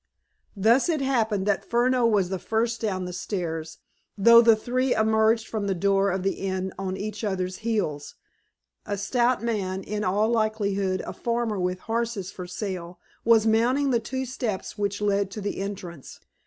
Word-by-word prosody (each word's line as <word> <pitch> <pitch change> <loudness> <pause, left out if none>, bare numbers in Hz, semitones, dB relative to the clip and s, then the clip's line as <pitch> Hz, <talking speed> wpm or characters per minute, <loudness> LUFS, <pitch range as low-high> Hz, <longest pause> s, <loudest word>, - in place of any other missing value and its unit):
Thus 230 - +4
it 320 -3 +1
happened 225 -7 0
that 205 -1 +1
Furneaux 245 0 +2
was 200 -5 +2
the 190 -1 -3
first 225 +4 -1
down 190 -4 -1
the 180 - -6
stairs, 165 -4 -4 0.4
though 235 +3 +8
the 230 -1 +6
three 250 +4 0
emerged 220 +1 +2
from 210 -2 -3
the 195 - 0
door 195 +2 +2
of 190 0 -2
the 195 - -1
inn 190 -1 -2
on 190 -1 -3
each 210 +1 -5
other's 185 -3 -2
heels. 200 -11 -2 0.7
A 205 -1 -2
stout 240 +4 +1
man, 195 -5 -2
in 210 0 -3
all 205 +3 +2
likelihood 200 -4 0
a - - -6
farmer 235 -3 -1
with 180 0 -2
horses 225 -4 -2
for 180 -2 -8
sale, 180 -2 -5 0.2
was 225 -1 +5
mounting 245 +6 +2
the 235 - +3
two 260 +4 -4
steps 240 -6 -4
which 205 0 -2
led 200 -1 +1
to 205 - -7
the 205 0 -3
entrance. 185 -7 -7
210 Hz, 170 wpm, -25 LUFS, 190-230 Hz, 0.7 s, though